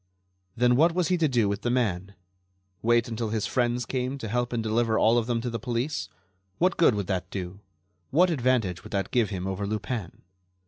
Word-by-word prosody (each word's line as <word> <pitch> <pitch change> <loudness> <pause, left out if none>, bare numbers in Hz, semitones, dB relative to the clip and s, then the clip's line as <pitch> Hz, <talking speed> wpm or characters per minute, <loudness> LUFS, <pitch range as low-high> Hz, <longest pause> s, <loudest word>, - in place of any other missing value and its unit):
Then 125 +1 +3
what 165 +5 +4
was 180 -3 +1
he 180 - +2
to 160 - +3
do 120 -6 +2
with 100 +1 -2
the 120 - -1
man? 100 -6 -1 0.7
Wait 120 0 +3
until 115 -1 -3
his 110 -1 -1
friends 120 -1 0
came 130 +2 -2
to 135 - -7
his 105 - -5
help 120 0 0
and 115 -2 -1
deliver 110 0 +1
all 115 +2 +4
of 115 - -4
them 120 -2 0
to 120 - -3
the 115 - -3
police? 125 +5 -2 0.5
What 180 +2 +2
good 160 -9 +4
would 100 -2 -2
that 95 -1 -2
do? 95 0 -6 0.5
What 175 +6 +4
advantage 120 - +1
would - - -11
that 100 -1 -1
give 120 -4 +2
him 95 -3 -4
over 95 +1 -3
Lupin? 110 -2 -4
115 Hz, 215 wpm, -27 LUFS, 105-125 Hz, 0.7 s, what